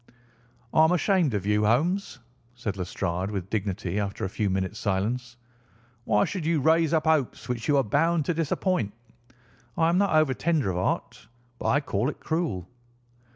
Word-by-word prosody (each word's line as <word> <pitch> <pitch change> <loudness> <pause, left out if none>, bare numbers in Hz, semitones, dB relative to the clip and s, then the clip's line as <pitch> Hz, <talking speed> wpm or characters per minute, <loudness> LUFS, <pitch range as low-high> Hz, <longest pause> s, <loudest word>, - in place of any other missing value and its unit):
"I 155 - +6
am 160 - +4
ashamed 180 - +2
of 100 -2 -2
you, 105 +1 +2
Holmes," 155 - +1 0.4
said 110 -5 -4
Lestrade 90 0 -3
with 100 -2 -5
dignity 100 -2 -2
after 100 -1 -3
a - - -3
few 100 +1 -1
minutes' 95 +2 -2
silence. 120 +5 -2 0.7
"Why 105 - +3
should 185 -5 -4
you 160 0 +1
raise 160 +2 +3
up 160 -1 +1
hopes 155 -5 +1
which 120 -2 -3
you 145 - +4
are 135 - +4
bound 155 +7 +1
to 175 - +1
disappoint? 165 - -1 0.8
I 165 0 +3
am 175 +2 +2
not 200 -5 +2
over 155 -4 +4
tender 145 - 0
of 90 - -3
heart, 90 - -2 0.3
but - - -3
I 145 - +3
call 120 -2 -1
it - - -7
cruel." 160 - -2
125 Hz, 175 wpm, -26 LUFS, 100-160 Hz, 0.8 s, I